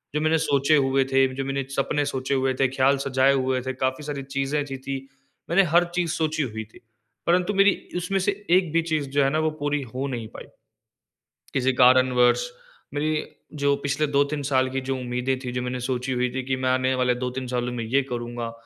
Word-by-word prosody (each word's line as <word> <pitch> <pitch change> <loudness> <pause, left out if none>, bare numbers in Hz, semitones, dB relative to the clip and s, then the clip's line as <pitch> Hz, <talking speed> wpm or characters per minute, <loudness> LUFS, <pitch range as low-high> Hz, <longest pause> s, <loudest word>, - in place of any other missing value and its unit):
जो 150 - +1
मैंने 155 +1 +3
सोचे 145 -1 +2
हुए 135 -1 +3
थे, 135 0 +4
जो 135 0 -3
मैंने 135 0 -2
सपने 145 +1 0
सोचे 130 -1 -2
हुए 130 -1 +1
थे, 135 +1 +2
ख़्याल 135 +2 +2
सजाए 135 0 +3
हुए 130 -1 0
थे, 130 +1 -4
काफ़ी 130 +2 -2
सारी 145 -2 -4
चीज़ें 135 +2 -2
ऐसी 135 -2 -5
थी 135 +1 -4 0.5
मैंने 185 +4 +5
हर 175 +1 +6
चीज़ 175 -2 0
सोची 155 -1 0
हुई 110 -4 -4
थी। - - -15 0.5
परंतु 180 +3 +2
मेरी 195 0 +2
उसमें 180 +2 -1
से 190 +2 +1 0.2
एक 180 -2 +3
भी 165 - +3
चीज़ 155 -4 -2
जो 140 +1 +2
है 135 - +3
ना 155 +3 0
वो 155 0 +1
पूरी 145 0 0
हो 135 +2 -2
नहीं 120 -4 -4
पाई। - - -8 1.1
किसी 130 -1 +2
कारण 130 +1 +6
वर्ष 125 - +4 0.5
मेरी 150 +1 0 0.4
जो 140 0 +4
पिछले 145 +2 +1
2-3 145 +1 0
साल 130 -1 +3
की 135 +1 -2
जो 135 - 0
उम्मीदें 125 +1 -2
थी 125 - -4
जो 125 0 -2
मैंने 125 0 -3
सोची 125 +1 -2
हुई 125 0 0
थी 130 - -2
कि 130 0 -1
मैं 130 - +2
आने 130 0 +2
वाले 125 -1 +2
2-3 125 +1 -4
सालों 125 0 -2
में 120 -2 -3
ये 135 +5 +2
करूँगा, 120 -1 -4
135 Hz, 215 wpm, -24 LUFS, 130-145 Hz, 1.1 s, हर